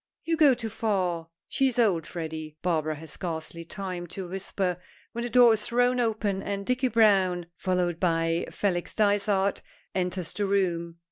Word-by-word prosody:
"You 330 - +1
go 295 -5 +6
too 230 -2 -5
far; 185 -7 -1 0.2
she 270 - +2
is 250 - -2
old, 190 -9 +2
Freddy," 155 -2 -6
Barbara 155 -3 0
has 160 +1 -8
scarcely 170 -1 -5
time 180 -1 -6
to 185 +2 -6
whisper, 185 -1 -2 0.3
when 235 0 -4
the 240 - -3
door 240 -1 +7
is 215 - 0
thrown 245 +1 +2
open, 215 -4 0
and 200 0 -4
Dicky 255 +2 +1
Browne, 195 -7 +3
followed 180 -2 -1
by 165 -1 +1
Felix 180 -4 -2
Dysart, 200 -2 +2 0.3
enters 180 -2 -2
the 205 -1 -1
room. 170 -4 0
190 Hz, 160 wpm, -27 LUFS, 170-220 Hz, 0.3 s, door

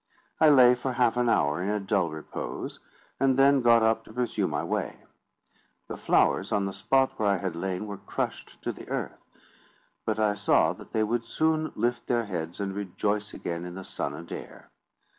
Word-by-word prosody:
I 155 - +7
lay 125 -4 +7
for 125 +1 -3
half 120 -1 +2
an 120 -1 +2
hour 75 -3 +2
in 95 - -1
a 105 0 0
dull 95 -3 0
repose, 80 0 -6 0.4
and 135 -1 +3
then 135 0 +5
got 115 -1 +5
up 110 0 +2
to - - -13
pursue 115 -5 -1
my 75 - -2
way. - - -3 0.9
The - - -4
flowers - - +2
on 100 -2 +1
the 95 - -3
spot 135 +7 +1
where 105 -2 +2
I 100 - +3
had 95 -2 -3
lain 95 +3 -3
were 100 -1 -6
crushed - - -5
to - - -1
the - - -11
earth: - - -4 0.8
but 110 -1 -1
I 105 -1 +2
saw 100 - +3
that - - -14
they 110 - +1
would 115 +2 -1
soon 155 +4 0
lift 120 0 -1
their 120 -2 +1
heads 85 -3 -5
and 100 -1 -2
rejoice 105 +1 -2
again 85 0 -4
in 90 0 -7
the 95 - -7
sun 70 -5 -4
and 85 +2 -10
air. - - -9
105 Hz, 200 wpm, -27 LUFS, 95-120 Hz, 0.9 s, I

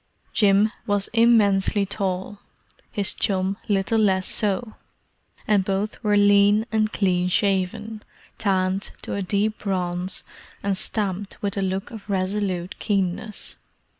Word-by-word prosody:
Jim 205 0 +4 0.2
was 205 -1 +1
immensely 210 -4 +4
tall; 195 0 -3 0.5
his 200 -2 0
chum 190 0 0
little 205 +2 +2
less 190 -3 +2
so; 215 +2 -1 0.7
and 205 -3 +3
both 195 +4 -2
were 210 -1 +3
lean 205 +1 +5
and 215 -1 +1
clean 180 -3 +1
shaven, 200 +3 0 0.4
tanned 190 -1 0
to - - -4
a 200 - -2
deep 205 +3 0
bronze, 185 -2 -2 0.4
and 200 -1 +1
stamped 200 0 -3
with 200 -1 -1
a 200 - -1
look 190 0 -2
of 215 -3 -10
resolute 190 -2 -1
keenness. 200 0 -2
200 Hz, 125 wpm, -23 LUFS, 190-210 Hz, 0.7 s, lean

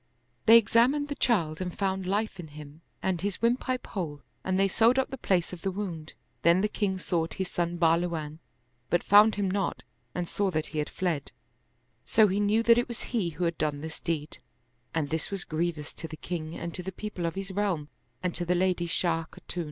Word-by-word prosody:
They 225 +1 +11
examined 245 +7 +3
the - - -1
child 175 - +1
and 180 -1 -4
found 190 -2 -1
life 205 0 -1
in 170 - -6
him 150 +1 -11 0.2
and 185 -3 0
his 200 -1 -2
windpipe 250 +2 0
whole 155 -7 -5 0.2
and 185 0 0
they 195 - +4
sewed 230 +6 +4
up 265 - +1
the - - -3
place 180 -5 +1
of 175 - -8
the 195 - 0
wound: 180 -5 -5 0.3
then 170 +3 +5
the 210 - +2
king 200 -3 -1
sought 165 -4 -1
his 190 -2 -3
son 175 0 -1
Bahluwan, 165 -2 +1 0.5
but 175 - +2
found 210 +2 +7
him 200 -1 0
not 195 0 -1 0.3
and 175 -1 -2
saw 200 +2 0
that 155 -3 -1
he 155 - -4
had 150 - -1
fled; 165 -6 -2 0.7
so 220 -1 +5
he 195 +1 0
knew 210 +2 +3
that 235 0 +6
it 240 - -1
was 235 -3 -6
he 205 -8 +1
who 165 +2 -4
had 170 -1 0
done 150 -2 -1
this 160 0 -6
deed, 155 -2 -3 0.5
and 155 -3 -1
this 160 0 -1
was 195 -2 -1
grievous 160 -1 -2
to 165 - -7
the 155 - -8
king 165 -2 -5
and 170 -1 -5
to 180 - -3
the 190 +2 -5
people 190 -3 -4
of 165 - -4
his 195 0 -4
realm 190 -7 -1 0.4
and 180 -2 0
to 175 - -3
the 175 +1 +1
lady 180 -1 +1
Shah 165 -1 +1
Khatun. 175 - -7
180 Hz, 215 wpm, -28 LUFS, 165-205 Hz, 0.7 s, They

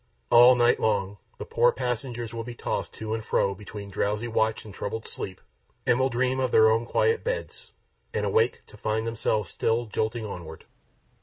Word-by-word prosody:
All 120 +2 +8
night 120 0 +3
long, 100 -2 0 0.2
the - - -6
poor 475 +1 +3
passengers 120 - -3
will 115 0 -4
be 120 +1 -8
tossed - - -3
to 110 0 -5
and 110 -1 -3
fro 100 -2 +1
between 100 0 -9
drowsy 105 +4 -1
watch 110 -1 0
and 105 - -10
troubled 110 +3 -5
sleep, 95 -1 -6 0.5
and 120 - +3
will 130 +1 +3
dream 130 +2 0
of 130 -1 +1
their 110 -1 +6
own 115 +1 +1
quiet 450 0 +2
beds, - - -4 0.4
and - - -1
awake 455 0 +1
to - - -16
find 110 +1 -1
themselves 110 -4 -1
still 115 +1 0
jolting 110 +1 -2
onward. 85 -6 -8
115 Hz, 180 wpm, -26 LUFS, 105-125 Hz, 0.5 s, All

